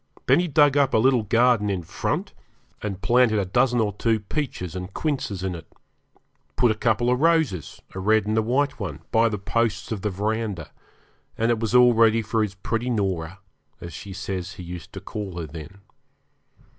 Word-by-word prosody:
Then - - +5
he 180 - 0
dug 145 -2 +4
up 140 -2 +3
a - - +6
little 125 +1 +4
garden 115 0 +3
in 95 -3 -2
front, - - -3 0.5
and 100 -2 -5
planted 120 +1 +4
a 100 - +1
dozen 125 +5 +2
or 105 -2 +1
two 110 +2 +1
peaches 105 - -4
and 90 +1 -5
quinces 115 - -3
in 95 -1 -2
it; 85 -2 -10 0.8
put 120 - +3
a - - +2
couple 115 +2 +1
of 125 - +1
roses 160 - +1
a 95 - -5
red 110 +2 +2
and 110 +1 -1
a 110 - +3
white 130 +5 0
one - - -5
by 115 0 +4
the 105 - -3
posts 105 +3 -1
of 105 -3 -3
the 105 - -1
verandah, 105 -3 -3 0.7
and 115 +1 +2
it 115 - 0
was 115 +1 -1
all 125 -1 +7
ready 115 0 +4
for 110 +1 0
his 105 -2 -2
pretty 115 +5 -2
Norah, 95 -5 -2 0.4
as 85 -1 -8
she 100 - -8
says 95 -2 -5
he 90 - -9
used 90 -1 -8
to - - -7
call 100 -4 -6
her 85 - -4
then. 80 +5 -10
110 Hz, 195 wpm, -24 LUFS, 95-120 Hz, 0.8 s, all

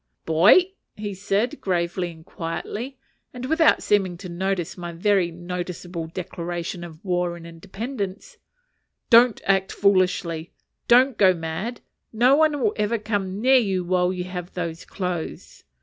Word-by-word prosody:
"Boy," 195 - +5 0.4
said 205 +4 0
he, - - -9
gravely 175 -1 -1
and 160 -1 -15
quietly, 210 +10 -5 0.4
and 250 0 -5
without 320 +3 +3
seeming 190 -4 +1
to 180 0 -9
notice 180 0 -2
my 175 -1 -6
very 185 +1 +2
noticeable 175 0 -5
declaration 175 0 -5
of 165 +1 -11
war 180 -2 0
and 165 - -12
independence, 200 - -6 0.7
"don't 235 -1 +6
act 195 0 +2
foolishly; 185 -4 +1 0.3
don't 250 0 +5
go 185 -2 +6
mad. 165 +9 -4 0.3
No 245 +4 +4
one 305 -1 +3
will 220 -5 +1
ever 210 +2 +1
come 205 -3 -3
near 260 +4 +5
you 190 -5 0
while 180 0 +1
you 180 -1 -3
have 180 -1 -7
those 170 -2 -4
clothes. 180 -4 -5
185 Hz, 140 wpm, -24 LUFS, 175-215 Hz, 0.7 s, don't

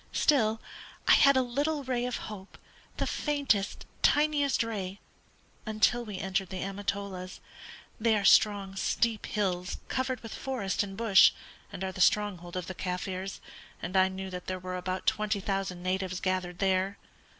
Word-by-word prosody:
Still, 225 -7 +3 0.5
I - - +6
had 275 -1 +7
a 260 - +4
little 285 +4 -1
ray 250 -2 -1
of 250 - -2
hope, 200 -2 -9 0.4
the - - 0
faintest, 275 -9 0 0.2
tiniest 295 -3 +3
ray, 200 -4 -4 0.6
until 220 +2 +2
we 210 -4 -6
entered 190 0 -1
the 190 -1 -4
Amatolas 195 -1 -4 0.6
they 220 -1 +3
are 200 - -1
strong 200 -1 +4
steep 225 +3 0
hills 185 -3 -1
covered 260 -2 -1
with 225 - -7
forest 240 -8 -2
and 195 -1 -5
bush, 215 -5 +6 0.4
and 190 - -6
are 190 - -2
the 185 - -5
stronghold 185 -3 +2
of 180 - -3
the 190 - -6
Kaffirs, 185 +1 -4 0.4
and 175 +3 -5
I 190 0 +6
knew 190 0 -6
that 180 -1 -7
there 185 - -2
were 185 0 -5
about 185 +1 -3
twenty 215 -2 +1
thousand 195 -2 -3
natives 185 0 -1
gathered 185 -2 -1
there. 190 +1 +1
195 Hz, 160 wpm, -29 LUFS, 185-225 Hz, 0.6 s, had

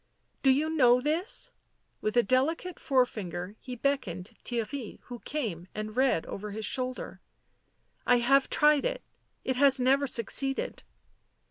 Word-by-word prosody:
" - - -45
Do 270 - +3
you 295 +4 +2
know 250 -4 +5
this?" 335 - -1 0.5
With 215 +3 -1
a 240 - +6
delicate 310 - 0
forefinger 210 - -1
he 250 -1 -7
beckoned 225 -7 -2
Theirry, 240 0 -4
who 245 -1 -9
came 215 - -4
and 215 0 -5
read 255 -10 +2
over 210 +2 -6
his 215 +1 -4
shoulder. 255 -1 -3 0.4
" - - -31
I - - +5
have 270 +3 +3
tried 300 -1 +4
it. - - -2 0.4
It 260 -1 -1
has 275 -1 +6
never 270 +3 +3
succeeded." 270 +3 0
255 Hz, 145 wpm, -29 LUFS, 220-280 Hz, 0.5 s, a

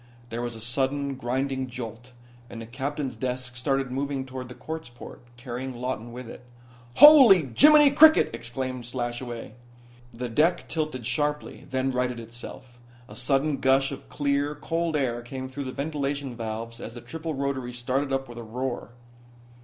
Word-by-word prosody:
There 115 +1 -3
was 120 -1 -4
a - - -9
sudden, 135 +4 -1
grinding 130 +1 -2
jolt, 120 0 -8 0.4
and 115 - -8
the 115 - -7
captain's 135 +2 -4
desk 125 +1 -4
started 135 +1 -1
moving 135 0 -2
toward 130 -1 -7
the 125 - -9
quartz 160 -3 -6
port, 120 0 -11 0.2
carrying 125 +1 -5
Lawton 120 -1 -4
with 125 0 -8
it. - - -10 0.5
"Holy 255 - +9
Jiminy 300 -1 +8
cricket," 315 +2 +7
exclaimed 125 +2 -4
Slashaway. 120 -1 -4 0.6
The 125 +1 -5
deck 155 +9 +2
tilted 155 -7 -3
sharply; 150 +5 -2
then 130 0 0
righted 125 -1 -1
itself. 120 +1 -10 0.3
A 105 - -12
sudden 135 +5 +1
gush 135 +1 +3
of 140 - -9
clear, 145 0 0
cold 165 +2 -2
air 125 -5 0
came 130 +2 -6
through 135 +2 -6
the 130 - -4
ventilation 140 -2 -3
valves 115 +1 -5
as 115 - -7
the 120 - -8
triple 160 +5 -5
rotaries 135 -3 -3
started 135 +3 -1
up 135 0 -1
with 120 0 -9
a - - -7
roar. 120 +1 -4
130 Hz, 160 wpm, -26 LUFS, 120-140 Hz, 0.6 s, Holy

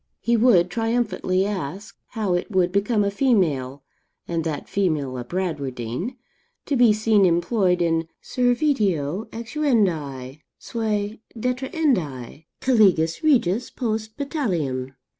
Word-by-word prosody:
He 235 - +1
would 210 -7 +4
triumphantly 225 -4 0
ask, 200 +1 -5 0.2
how 215 -6 -1
it 175 +4 -1
would 185 -3 +2
become 205 +2 +1
a 200 - 0
female, 155 - +1 0.4
and 165 -1 -1
that 155 -3 -4
female 155 -9 -1
a 125 - -4
Bradwardine, 145 - -4 0.5
to 285 - 0
be 240 -3 +6
seen 215 -1 +3
employed 180 +1 +2
in 165 -1 0
servitio 225 - 0
exuendi, 185 - -1 0.2
seu 215 -2 -2 0.2
detrahendi, 245 - -1 0.2
caligas 190 -10 +3
regis 240 - +2
post 220 -3 -3
battaliam? 165 - -2
195 Hz, 110 wpm, -23 LUFS, 160-230 Hz, 0.5 s, be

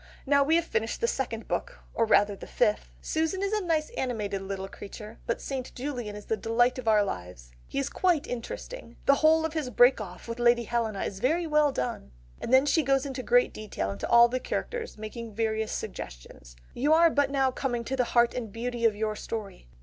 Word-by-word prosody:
Now 280 0 +4
we 315 +4 +3
have 335 0 +2
finished 225 -6 -2
the 465 - +1
second 235 - -3
book - - -3 0.2
or 230 - +2
rather 205 -2 +4
the - - -10
fifth: 215 -4 +1
Susan 320 +5 -1
is 400 +1 -1
a 425 -2 0
nice 315 -3 0
animated 210 -6 -2
little 195 0 -5
creature, 210 +3 -10
but 235 - -1
St. 265 -2 -5
Julian 245 -6 -4
is 210 - -9
the 220 - 0
delight 240 +4 +1
of 240 - -7
our 215 -2 +5
lives. 90 - -6 0.2
He - - -6
is 275 0 0
quite 350 -1 +1
interesting. 250 - -7
The 280 - +6
whole 320 +1 +5
of 320 - -3
his 310 -5 -2
break 245 -1 +5
off 180 -1 -9
with 230 +1 -5
Lady 240 0 +4
Helena 225 -3 -1
is 190 - -4
very 325 - +1
well 300 -2 +3
done." 65 - -4 0.3
She - - -5
then 260 +3 +5 0.2
goes 270 -1 +2
in 275 - -4
great 485 - +2
detail 210 - -4
into 100 - -5
all 235 0 +8
the 255 +2 -2
characters, 470 - -4
making 220 0 -7
various 220 -1 -1
suggestions: - - -7 0.2
"You 290 +5 +2
are 330 +1 +6
but 285 -2 +2
now 270 -2 +2
coming 245 -2 -2
to 265 +3 -3
the 250 -2 +1
heart 235 0 +3
and 230 -4 -5
beauty 235 +1 -3
of 220 -2 +4
your 215 0 -2
story. 210 - -6
240 Hz, 210 wpm, -28 LUFS, 215-280 Hz, 0.3 s, all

